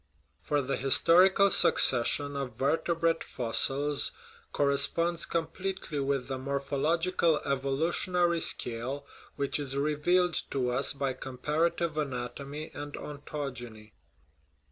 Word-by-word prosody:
For 145 -1 -1
the 135 +1 -2
his 135 0 +5
torical 190 +3 +5
succession 140 +2 +4
of 135 -2 -5
vertebrate 165 +3 0
fossils 135 +4 0 0.4
corresponds 165 +4 +1
com 165 -1 -1
pletely 185 -7 -4
with 135 -2 -1
the 135 -1 -4
morphological 150 +5 0
evolutionary 165 +5 0
scale 125 +4 -2 0.3
which 140 +1 -2
is 135 -1 -3
revealed 155 +5 +1
to 125 -3 -1
us 130 +4 0
by 135 -1 -2
comparative 155 +5 -2
anatomy 140 +2 -5
and 145 0 -7
ontogeny. 125 -7 -7
145 Hz, 105 wpm, -29 LUFS, 135-165 Hz, 0.4 s, his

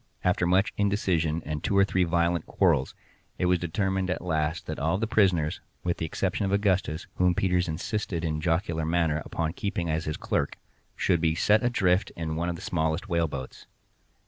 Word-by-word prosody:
After 90 -1 +2
much 95 +3 +2
indecision 90 -6 +1
and 75 -1 -4
two 100 - +1
or 100 - +6
three 95 -2 +1
violent 85 -1 +1
quarrels, 80 -9 +2 0.4
it - - 0
was 90 0 +3
determined 95 +2 -1
at 90 -1 -2
last 80 -1 -1
that 80 - -5
all 80 +5 +1
the 110 - 0
prisoners 95 -9 +2 0.2
(with 85 -1 -1
the 80 - -2
exception 95 +5 -1
of 95 - 0
Augustus, 95 -5 +1
whom 90 -1 +3
Peters 90 -3 +1
insisted 85 +1 -3
in 80 -1 -1
a - - -4
jocular 80 0 0
manner 80 -2 +1
upon 80 -1 -2
keeping 90 -4 -2
as 80 +1 -1
his 75 - -3
clerk) - - -1 0.4
should 85 -3 +1
be 80 -1 +2
set 105 +5 +4
adrift 100 -6 +2
in 80 -2 -3
one 85 +2 -1
of 85 - -2
the - - -10
smallest 80 +4 -1
whaleboats. 80 -7 -2
85 Hz, 190 wpm, -27 LUFS, 80-95 Hz, 0.4 s, or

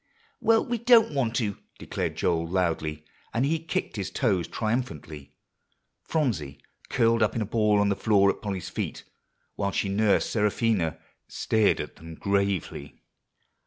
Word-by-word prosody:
"Well, 225 0 +3
we 240 -1 -2
don't 235 -6 +5
want 120 -5 0
to," 105 -5 -1 0.2
declared - - -3
Joel 85 -1 0
loudly, 80 -4 -1 0.3
and 120 +4 +2
he 160 +3 +1
kicked 160 -7 -3
his 95 -2 -3
toes 95 -5 0
triumphantly. 80 - -4 0.7
Phronsie, 80 - -2 0.3
curled 115 -1 +2
up - - +2
in 115 - -1
a - - -4
ball 105 -1 +2
on 100 0 +3
the 100 - +1
floor 100 -2 +4
at - - -10
Polly's 95 -4 -4
feet, - - -4 0.5
while 100 -1 -1
she 100 - -1
nursed 100 +1 +2
Seraphina, 105 -5 +1 0.3
stared 110 -2 +1
at - - -6
them 80 0 -10
gravely. 100 -7 -2
100 Hz, 150 wpm, -26 LUFS, 85-115 Hz, 0.7 s, don't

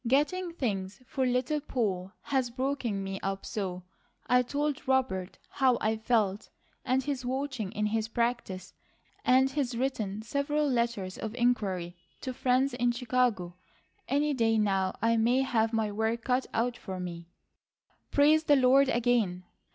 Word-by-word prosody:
"Getting 335 +8 +1
things 200 - -3
for 260 0 -1
Little 250 +4 +1
Poll 200 -10 -2
has 265 -3 0
broken 250 -5 -2
me 195 0 -4
up 195 0 -3
so, 185 -4 -4 0.4
I 250 0 +4
told 285 +2 -2
Robert 245 -9 0
how 260 -3 +3
I 220 +1 +1
felt, 220 -3 0 0.3
and 260 +1 +1
he's 275 -2 -3
watching 260 -5 -3
in 210 -1 -1
his 220 +1 0
practice, 235 -5 -2 0.5
and 260 +1 +4
he's 265 -4 -1
written 220 -5 -2
several 290 +5 0
letters 235 -7 -1
of 220 +1 -5
inquiry 200 -8 0 0.3
to 260 - -4
friends 255 +1 +2
in 245 0 +1
Chicago. 240 -7 0 0.5
Any 290 +2 +1
day 225 -3 +2
now 195 -3 +1
I 230 0 +3
may 240 +4 +3
have 225 -4 +1
my 220 -2 0
work 220 +2 -1
cut 255 0 +1
out 235 +1 0
for 190 -5 -6
me." 170 -2 -6 0.8
"Praise 305 +2 +4
the 290 - +6
Lord 265 +1 +5
again!" 230 -7 +1
240 Hz, 150 wpm, -29 LUFS, 210-265 Hz, 0.8 s, the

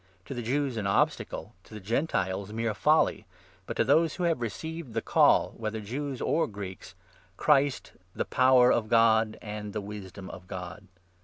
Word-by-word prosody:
— 95 +1 -36
to - - -6
the 120 - -4
Jews 130 +1 -1
an 105 -2 -2
obstacle, 100 - 0
to 110 - -13
the - - -6
Gentiles 100 - -1
mere 115 0 -1
folly, 150 - +2 0.4
but - - -5
to - - +4
those 155 +6 +3
who 180 - -3
have 165 -7 +1
received 160 +4 -5
the 115 - 0
Call, - - +4
whether 110 0 -3
24 105 -2 -8
Jews 135 +2 -4
or 165 - +1
Greeks, 100 -3 -8 0.4
Christ, 140 -2 +2 0.2
the - - -1
Power 130 -1 +5
of 110 -2 -1
God 110 -1 +4
and 105 -1 -6
the - - -2
Wisdom 100 -2 -8
of 90 -1 -11
God 90 -1 -8
115 Hz, 180 wpm, -28 LUFS, 100-135 Hz, 0.4 s, Power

